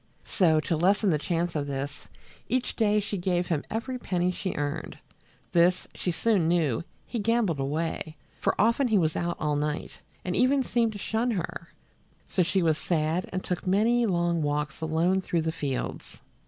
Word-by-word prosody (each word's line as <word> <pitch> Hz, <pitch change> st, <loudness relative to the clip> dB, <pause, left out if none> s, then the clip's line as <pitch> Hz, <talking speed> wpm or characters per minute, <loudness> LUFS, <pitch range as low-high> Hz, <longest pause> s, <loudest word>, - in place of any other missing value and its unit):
So, 160 Hz, -5 st, +3 dB
to 165 Hz, -, -1 dB
lessen 195 Hz, +4 st, +3 dB
the 150 Hz, -, +1 dB
chance 170 Hz, +2 st, -1 dB
of 145 Hz, -2 st, -1 dB
this, 140 Hz, +1 st, -5 dB, 0.4 s
each 255 Hz, +2 st, 0 dB
day 210 Hz, -2 st, +3 dB
she 205 Hz, 0 st, -3 dB
gave 180 Hz, 0 st, 0 dB
him 155 Hz, -4 st, 0 dB
every 250 Hz, +3 st, -3 dB
penny 180 Hz, -4 st, 0 dB
she 185 Hz, +1 st, -4 dB
earned. 145 Hz, +2 st, -3 dB, 0.5 s
This, 175 Hz, +1 st, +3 dB
she -, -, -3 dB
soon 185 Hz, 0 st, +2 dB
knew, 160 Hz, -8 st, +1 dB, 0.2 s
he 235 Hz, -, -4 dB
gambled 215 Hz, -7 st, +1 dB
away, 155 Hz, +3 st, -2 dB, 0.2 s
for -, -, 0 dB
often 235 Hz, +6 st, +3 dB
he 220 Hz, -3 st, +3 dB
was 160 Hz, -4 st, +1 dB
out 175 Hz, 0 st, -1 dB
all 150 Hz, -1 st, 0 dB
night, 150 Hz, +1 st, -3 dB, 0.3 s
and 180 Hz, -, -1 dB
even 265 Hz, +2 st, +3 dB
seemed 230 Hz, -3 st, +1 dB
to -, -, -6 dB
shun 225 Hz, +4 st, -1 dB
her; 175 Hz, -5 st, -3 dB, 0.6 s
so 185 Hz, -, +1 dB
she 180 Hz, +1 st, +2 dB
was 160 Hz, -2 st, +2 dB
sad 165 Hz, +1 st, 0 dB
and 185 Hz, 0 st, -3 dB
took 180 Hz, 0 st, -3 dB
many 230 Hz, +5 st, +3 dB
long 170 Hz, -3 st, +1 dB
walks 145 Hz, 0 st, -2 dB
alone 165 Hz, +4 st, +2 dB
through 170 Hz, -3 st, -1 dB
the 160 Hz, -, 0 dB
fields. 145 Hz, -5 st, -4 dB
175 Hz, 180 wpm, -27 LUFS, 155-205 Hz, 0.6 s, So